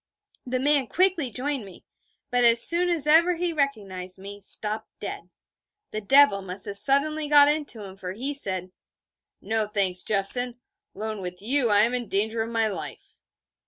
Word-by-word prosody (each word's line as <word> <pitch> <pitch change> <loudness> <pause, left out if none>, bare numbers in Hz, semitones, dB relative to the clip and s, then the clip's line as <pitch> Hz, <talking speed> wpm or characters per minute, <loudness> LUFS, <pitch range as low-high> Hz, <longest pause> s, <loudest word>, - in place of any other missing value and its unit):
The 255 0 -3
man 280 -1 0
quickly 355 -5 -1
joined 265 +2 -4
me, 190 -3 -16 0.5
but 245 0 0
as 235 0 +7
soon 350 +1 +3
as 330 -5 +1
ever 335 +4 +3
he 345 0 -3
recognised 200 - -4
me, 200 +1 -12
stopped 215 +2 0
dead. - - -9 0.6
The 215 - -6
devil 270 -1 +3
must 190 +1 -6
have 200 0 +2
suddenly 300 +5 +1
got 290 -1 +5
into 290 -7 -4
him, 190 -1 -12
for 185 -1 -8
he 265 +8 -5
said: 185 -9 -2 0.7
'No, 220 -1 -2
thanks, 195 -3 +2
Jeffson: 235 +5 +4 0.4
alone 215 0 -7
with 180 -1 -7
you 250 +1 +1
I 205 0 +5
am 235 +3 +2
in 245 -2 -2
danger 220 +4 -2
of 225 - -5
my 225 -1 -1
life....' 200 - -8
230 Hz, 170 wpm, -23 LUFS, 200-285 Hz, 0.7 s, as